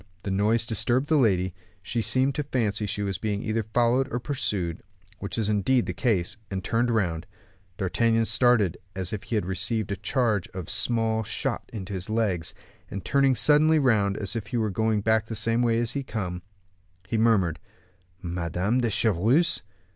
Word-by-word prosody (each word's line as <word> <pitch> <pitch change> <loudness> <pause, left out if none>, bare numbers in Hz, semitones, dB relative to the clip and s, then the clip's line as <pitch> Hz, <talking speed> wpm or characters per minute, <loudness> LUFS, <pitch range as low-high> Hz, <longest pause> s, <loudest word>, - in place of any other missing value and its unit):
The 100 - -3
noise 110 +4 +2
disturbed 120 +5 +1
the 160 - +4
lady; 95 - +2 0.3
she 115 +6 -1
seemed 130 +4 +1
to 150 - -1
fancy 110 -7 -1
she 105 +1 -2
was 95 -2 -3
being 105 -1 -2
either 110 +1 0
followed 120 +4 +1
or 120 - -1
pursued, 100 - -2 0.4
which 100 - -5
was 110 -3 0
indeed 110 +4 +2
the - - -3
case, 105 -8 0
and 95 -1 -4
turned 120 +2 +1
round. 90 -7 0 0.5
D'Artagnan 115 +4 +1
started 115 -8 +3 0.2
as 95 0 -4
if 105 - -3
he 115 - -3
had 105 - 0
received 100 +3 -2
a - - 0
charge 110 -6 0
of 90 -4 -4
small 115 -2 +1
shot 110 0 -3
in 105 -5 -6
his 95 0 -5
legs, 105 -7 0 0.3
and 100 - -5
then - - -27
turning 135 -1 +3
suddenly 150 +6 +5
round 110 -8 +2
as 105 +2 -2
if 110 -2 -4
he 120 - -2
were 110 -2 0
going 110 +2 +1
back 110 0 +2
the 115 - -5
same 115 +2 +1
way 115 -2 +2
he 120 +5 -3
had 135 - -7
come, 90 -5 -4 0.7
he 115 - -2
murmured, 95 -9 +2 0.6
"Madame 90 +7 -1
de 120 - +1
Chevreuse!" 110 - +2
110 Hz, 185 wpm, -26 LUFS, 95-120 Hz, 0.7 s, suddenly